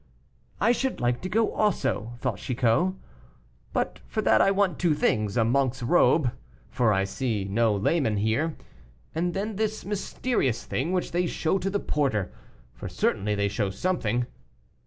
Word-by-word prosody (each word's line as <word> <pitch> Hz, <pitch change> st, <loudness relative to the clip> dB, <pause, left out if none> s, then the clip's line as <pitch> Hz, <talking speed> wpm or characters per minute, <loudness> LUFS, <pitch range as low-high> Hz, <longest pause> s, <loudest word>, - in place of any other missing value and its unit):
"I 225 Hz, -, +4 dB
should 265 Hz, +1 st, -1 dB
like 120 Hz, 0 st, 0 dB
to 185 Hz, -, -4 dB
go 225 Hz, +2 st, +1 dB
also," 170 Hz, -, 0 dB
thought -, -, -2 dB
Chicot; 130 Hz, +9 st, +1 dB, 0.8 s
"but -, -, -2 dB
for -, -, -2 dB
that 110 Hz, -1 st, +5 dB
I -, -, +5 dB
want 195 Hz, -2 st, +1 dB
two 170 Hz, -4 st, +2 dB
things 110 Hz, -7 st, +1 dB
a 115 Hz, -, +4 dB
monk's 130 Hz, +1 st, +1 dB
robe, 150 Hz, -1 st, +4 dB, 0.4 s
for 120 Hz, -4 st, +2 dB
I 95 Hz, -1 st, +2 dB
see 105 Hz, -1 st, -2 dB
no 110 Hz, +2 st, +2 dB
layman 110 Hz, -, +1 dB
here, 115 Hz, +10 st, 0 dB, 0.6 s
and 175 Hz, +2 st, -1 dB
then 205 Hz, +1 st, -3 dB
this 215 Hz, 0 st, -2 dB
mysterious 200 Hz, -, -1 dB
thing 145 Hz, +7 st, -2 dB
which 185 Hz, -1 st, -1 dB
they 175 Hz, +1 st, +1 dB
show 170 Hz, +3 st, 0 dB
to 195 Hz, -, -1 dB
the 200 Hz, +1 st, 0 dB
porter, 130 Hz, -, -1 dB, 0.4 s
for -, -, -7 dB
certainly 105 Hz, +1 st, 0 dB
they 100 Hz, 0 st, +1 dB
show 100 Hz, 0 st, -1 dB
something. 125 Hz, -, -1 dB
135 Hz, 160 wpm, -26 LUFS, 110-185 Hz, 0.8 s, that